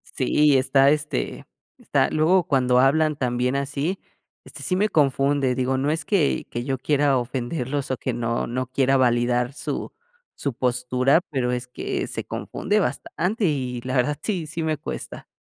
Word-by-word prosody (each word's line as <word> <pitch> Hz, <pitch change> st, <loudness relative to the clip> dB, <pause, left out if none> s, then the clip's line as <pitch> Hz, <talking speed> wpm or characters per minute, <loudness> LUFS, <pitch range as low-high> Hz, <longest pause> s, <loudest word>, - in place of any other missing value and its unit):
Sí, 150 Hz, -2 st, +3 dB
está 135 Hz, +1 st, +4 dB
este 150 Hz, -, -2 dB, 0.3 s
está, -, -, +1 dB
luego 170 Hz, +4 st, +3 dB
cuando 130 Hz, -6 st, +2 dB
hablan 155 Hz, +4 st, +3 dB
también 125 Hz, -1 st, -1 dB
así, 140 Hz, +6 st, -2 dB, 0.4 s
este, -, -, -8 dB
sí 180 Hz, -, 0 dB
me 205 Hz, +3 st, +2 dB
confunde 140 Hz, -3 st, +2 dB
digo 130 Hz, +1 st, 0 dB
no 140 Hz, +2 st, 0 dB
es 160 Hz, +2 st, -1 dB
que 180 Hz, -9 st, +1 dB
que 120 Hz, -, -3 dB
yo 135 Hz, +1 st, -2 dB
quiera 145 Hz, 0 st, +2 dB
ofenderlos 130 Hz, +3 st, -3 dB
o 130 Hz, -, -1 dB
que 130 Hz, -, -3 dB
no 115 Hz, 0 st, -1 dB
no 130 Hz, +2 st, -3 dB
quiera 135 Hz, +1 st, +2 dB
validar 120 Hz, 0 st, +2 dB
su -, -, -4 dB, 0.4 s
su 140 Hz, -, -3 dB
postura, 125 Hz, +4 st, +2 dB
pero, 130 Hz, -5 st, -1 dB
es 125 Hz, 0 st, -3 dB
que, 125 Hz, -, -3 dB
se -, -, -5 dB
confunde -, -, -2 dB
bastante 200 Hz, +4 st, -1 dB
y 130 Hz, -6 st, -1 dB
la 130 Hz, +1 st, -3 dB
verdad 135 Hz, +4 st, +1 dB
sí 185 Hz, -7 st, -2 dB
sí 165 Hz, +2 st, -5 dB
me 155 Hz, -1 st, 0 dB
cuesta. -, -, -7 dB
135 Hz, 165 wpm, -23 LUFS, 125-150 Hz, 0.4 s, está